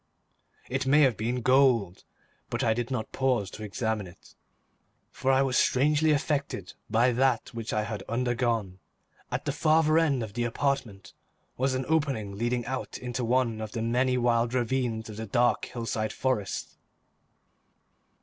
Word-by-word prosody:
It 130 +1 -2
may 145 +3 +5
have 130 -5 +4
been 120 +4 -2
gold, 125 -8 +3 0.4
but - - -2
I 110 - +3
did 120 +2 -3
not 125 -5 -3
pause 125 -8 0
to - - -9
examine 105 -1 -2
it, 85 - -17 0.8
for 130 - -2
I 135 +1 +4
was 130 -2 +2
strangely 150 +4 +3
affected 140 - -1 0.2
by 120 +3 +3
that 125 -1 +1
which 115 -1 -5
I 105 - 0
had 105 -2 -5
undergone. 115 -5 -1 0.5
At - - -3
the - - 0
farther 155 0 +3
end 140 -7 +1
of 105 -2 -7
the 120 +1 -1
apartment 115 -6 -2 0.4
was 130 +1 0
an 130 0 -2
opening 135 -11 0
leading 120 +2 -1
out 130 -1 -4
into 125 0 -4
one 115 -2 +1
of 110 -1 -6
the 115 - -2
many 125 +2 +1
wild 120 0 +1
ravines 120 -2 -1
of 105 -1 -9
the 110 0 -5
dark 120 +4 +2
hillside 115 -2 -3
forest. 125 -7 -2
120 Hz, 160 wpm, -28 LUFS, 110-130 Hz, 0.8 s, may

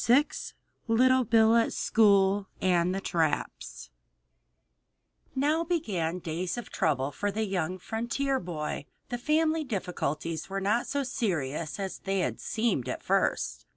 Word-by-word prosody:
II 275 +5 +7 0.6
LITTLE 255 +2 +4
BILL 225 0 +5
AT 230 - +2
SCHOOL 200 -2 +3
AND 180 0 +2
AT 195 - -4
THE - - -3
TRAPS 160 - -2 1.4
Now 300 +5 +2
began 200 - -1
days 175 +3 -3
of 240 - -7
trouble 140 -2 0
for 205 - -2
the 220 +2 -1
young 185 -2 -2
frontier 235 +7 -1
boy. 155 -4 -4 0.2
The 245 - -3
family 315 +4 +2
difficulties 170 - -3
were 195 0 -2
not 210 +5 +1
so 285 0 -1
serious 165 - -2
as 195 -1 -4
they 195 -1 -1
had - - -2
seemed 220 - -1
at - - -4
first. - - 0
195 Hz, 140 wpm, -29 LUFS, 170-240 Hz, 1.4 s, II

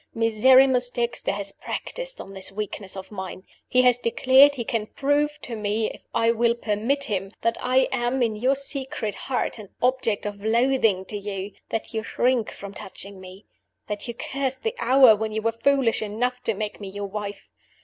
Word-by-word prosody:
Miserrimus 245 +3 +5
Dexter 240 -1 -1
has 200 0 -2
practiced - - -5
on 195 - -9
this 190 0 -1
weakness 195 -1 -5
of 190 - -8
mine. 190 -1 -7 0.2
He 255 0 +4
has 250 -1 +5
declared 265 +4 +5
he 240 - -3
can 220 -2 -2
prove 290 +3 0
to 235 - -5
me 215 +1 -1
(if - - -15
I 230 0 +3
will 235 0 +2
permit 235 +5 0
him) 195 -5 -2
that 230 0 +1
I 255 +1 +3
am, 245 +2 0
in 225 -2 0
your 255 +6 +2
secret 270 -5 -2
heart, 245 +2 -3
an 205 -3 -10
object 250 -5 +1
of 205 -1 -5
loathing 225 -4 +2
to 210 - -7
you; 200 0 -5 0.2
that 225 - -4
you 220 - -1
shrink 245 0 +1
from 200 0 -9
touching 195 0 -9
me; 185 +2 -12 0.4
that 210 +3 -5
you 235 - -5
curse 265 +1 -2
the 450 - -3
hour 260 -4 +7
when 220 +1 -3
you 220 0 -2
were 230 - +2
foolish 255 0 +2
enough 245 +4 -2
to 225 - 0
make 210 +1 -5
me 200 - -6
your 200 +1 -5
wife. 205 0 -6
230 Hz, 190 wpm, -24 LUFS, 205-255 Hz, 0.4 s, hour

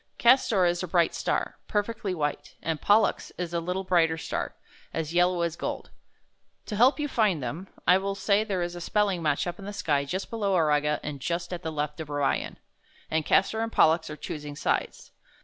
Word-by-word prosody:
''Castor 235 -6 +4
is 175 0 0
a 185 - -3
bright 170 -1 +2
star, - - -2
perfectly 210 -2 -1
white, 150 -3 -3
and 160 -2 -2
Pollux 210 +2 +3
is 175 -1 -4
a 170 - +1
little 180 +3 -2
brighter 165 -3 +2
star, - - -4 0.4
as 160 0 -3
yellow 175 0 +3
as 170 -1 -1
gold. - - -5 0.7
To 210 - -4
help 245 +6 +5
j^ou 295 -1 -1
find 210 - +1
them, 155 +10 -5 0.2
I 185 - +6
will 195 0 -2
say 200 +1 +2
there 195 -5 -1
is 175 0 -3
a 175 - -7
spelling 200 -1 +1
match 150 -3 +1
up 175 +2 -5
in 195 - -8
the 205 - -5
sky 145 -7 0
just 185 +7 -4
below 205 -4 0
Auriga, 150 -2 +2
and 145 -1 -5
just 170 +5 -3
at 175 - -4
the 160 - -4
left 150 0 -3
of 155 -2 -6
Orion, 145 -1 -1 0.5
and 160 -1 0
Castor 220 +3 +3
and 225 0 -2
Pollux 160 -3 +3
are 150 - -7
choosing 150 -2 -6
sides. - - -2
175 Hz, 200 wpm, -27 LUFS, 155-200 Hz, 0.7 s, I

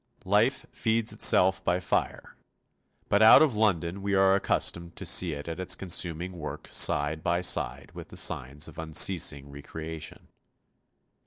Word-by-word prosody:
Life 105 +7 +1
feeds 115 -1 -1
itself 95 +1 +3
by 90 0 0
fire, 90 - -3 0.7
but 100 - +1
out 110 +7 +8
of 140 -8 0
London 95 -3 -1
we 100 0 -2
are 95 0 +3
accustomed 85 -3 -2
to - - -6
see 85 -3 +2
it 70 +1 -8
at 80 +1 -6
its 95 - 0
consuming 90 0 -3
work 75 - -8
side 75 +1 +2
by 85 +2 -1
side 65 -7 -1
with - - -10
the - - -8
signs 70 +4 -2
of 80 +1 -12
unceasing 80 -3 +1
re 70 0 -11
creation. 80 +1 -9
85 Hz, 155 wpm, -26 LUFS, 80-95 Hz, 0.7 s, out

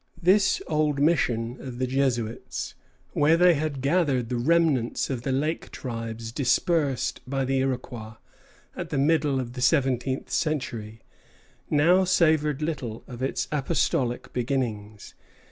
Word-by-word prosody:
This 190 +4 +3
old 150 -2 0
mission 125 -6 +1
of 125 -2 -7
the 130 - 0
Jesuits, 125 -4 -2 0.4
where 155 +3 +3
they 180 0 +6
had 150 -3 -2
gathered 140 -5 +1
the 125 - -1
remnants 140 -2 +1
of 125 -3 -3
the 135 - -2
lake 150 +5 -1
tribes 115 -2 -6
dispersed 140 +2 +1
by 135 0 0
the 135 0 +1
Iroquois 125 -4 -3 0.6
at - - -5
the 145 - -2
middle 145 -1 +2
of 120 -2 -5
the 125 - -6
seventeenth 130 -1 +1
century, 115 -8 -2 0.7
now 170 +6 +4
savored 155 -5 +2
little 130 -8 -4
of 125 -1 -9
its 135 - -1
apostolic 135 -4 0
beginnings. 115 -5 -3
135 Hz, 130 wpm, -26 LUFS, 120-155 Hz, 0.7 s, they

